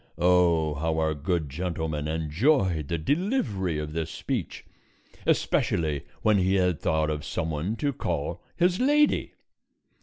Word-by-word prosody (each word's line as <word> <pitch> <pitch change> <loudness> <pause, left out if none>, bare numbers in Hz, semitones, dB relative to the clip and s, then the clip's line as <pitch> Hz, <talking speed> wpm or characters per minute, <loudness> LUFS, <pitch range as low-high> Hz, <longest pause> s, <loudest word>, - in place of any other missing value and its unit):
Oh, 85 -3 +3
how 80 +2 -1
our 80 -1 +1
good 80 +2 -1
gentleman 80 -1 -3
enjoyed 80 - +1
the 85 - -1
delivery 105 - 0
of 75 0 -4
this 80 -1 -2
speech, - - -4 0.6
especially 75 -4 +1 0.2
when 105 -2 +4
he 95 +1 +2
had 90 -4 +2
thought 80 -1 +1
of 75 0 -3
some 80 +2 -3
one 80 +9 -2
to 140 +4 -1
call 85 - -3
his 180 +2 +2
Lady! 295 +3 +2
85 Hz, 140 wpm, -27 LUFS, 75-95 Hz, 0.6 s, when